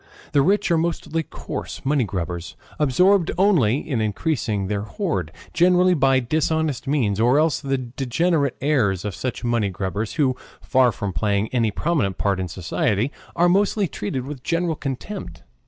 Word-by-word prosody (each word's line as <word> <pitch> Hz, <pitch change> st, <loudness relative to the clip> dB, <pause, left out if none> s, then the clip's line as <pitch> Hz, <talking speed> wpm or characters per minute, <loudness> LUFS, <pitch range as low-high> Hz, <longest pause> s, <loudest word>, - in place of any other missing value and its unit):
The 140 Hz, -, +4 dB
rich 195 Hz, +5 st, +2 dB
are 165 Hz, -, +4 dB
mostly 165 Hz, -1 st, -1 dB
coarse 155 Hz, -, -7 dB
money 140 Hz, -3 st, +2 dB
grubbers, 85 Hz, -3 st, -4 dB, 0.2 s
absorbed 180 Hz, +6 st, +3 dB
only, 165 Hz, -, +4 dB
in 125 Hz, -7 st, -1 dB
increasing 110 Hz, -, -1 dB
their 100 Hz, +1 st, -2 dB
hoard, 105 Hz, -, -3 dB, 0.2 s
generally 180 Hz, +1 st, +4 dB
by 135 Hz, -4 st, +3 dB
dishonest 155 Hz, +2 st, -1 dB
means, 120 Hz, -8 st, +1 dB
or 120 Hz, +5 st, +4 dB
else 155 Hz, -1 st, +2 dB
the 135 Hz, -1 st, 0 dB
degenerate 135 Hz, +4 st, 0 dB
heirs 115 Hz, -, +1 dB
of 105 Hz, -, -3 dB
such 130 Hz, +7 st, -4 dB
money 120 Hz, -4 st, +1 dB
grubbers, 95 Hz, +3 st, -3 dB
who, 135 Hz, -5 st, +1 dB, 0.2 s
far 130 Hz, -2 st, +3 dB
from 100 Hz, -2 st, -4 dB
playing 105 Hz, +2 st, 0 dB
any 115 Hz, -3 st, +1 dB
prominent 110 Hz, -, -1 dB
part 100 Hz, -2 st, 0 dB
in 95 Hz, -, -2 dB
society, 100 Hz, -, -1 dB, 0.2 s
are 175 Hz, -, +4 dB
mostly 200 Hz, +2 st, +2 dB
treated 130 Hz, -1 st, -4 dB
with 140 Hz, -2 st, -7 dB
general 170 Hz, +3 st, 0 dB
contempt. 135 Hz, -, -6 dB
130 Hz, 155 wpm, -22 LUFS, 105-160 Hz, 0.2 s, The